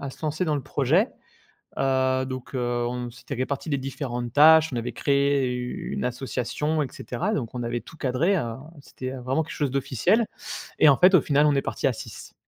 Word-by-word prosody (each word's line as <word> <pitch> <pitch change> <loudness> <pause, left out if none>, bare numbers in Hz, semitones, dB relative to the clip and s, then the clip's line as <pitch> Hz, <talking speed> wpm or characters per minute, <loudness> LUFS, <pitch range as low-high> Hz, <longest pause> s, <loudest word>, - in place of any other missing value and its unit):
à 140 -1 -5
se - - -15
lancer 155 +3 -1
dans 155 -3 0
le - - -2
projet. 150 - +2 0.7
Heu, 130 -1 +1
donc 130 0 -7
heu, 130 - 0 0.3
on 125 0 -4
s'était 125 +3 -8
réparti 135 +5 -3
les 140 - +1
différentes 125 -3 -4
tâches, 160 +2 +7
on - - -2
avait 120 +1 -3
créé 140 0 +1
une 125 0 -4
association 135 +5 -2
et 140 - -4
cetera. 180 - -3
Donc 125 - -3
on 120 - -3
avait 120 0 -2
tout 160 - -14
cadré, 150 +8 +1
heu, 115 -9 -2 0.3
c'était, 130 -2 -7
heu, 135 - -6
vraiment 135 +6 0
quelque - - -8
chose 145 -4 -1
d'officiel 140 - +1 0.5
et 155 - +7
en 140 - +5
fait, 185 +2 +6
au 160 - +6
final 145 0 +3
on 145 - +3
est 135 - +2
parti - - -1
à - - +1
6. - - -10
135 Hz, 210 wpm, -25 LUFS, 125-150 Hz, 0.7 s, tâches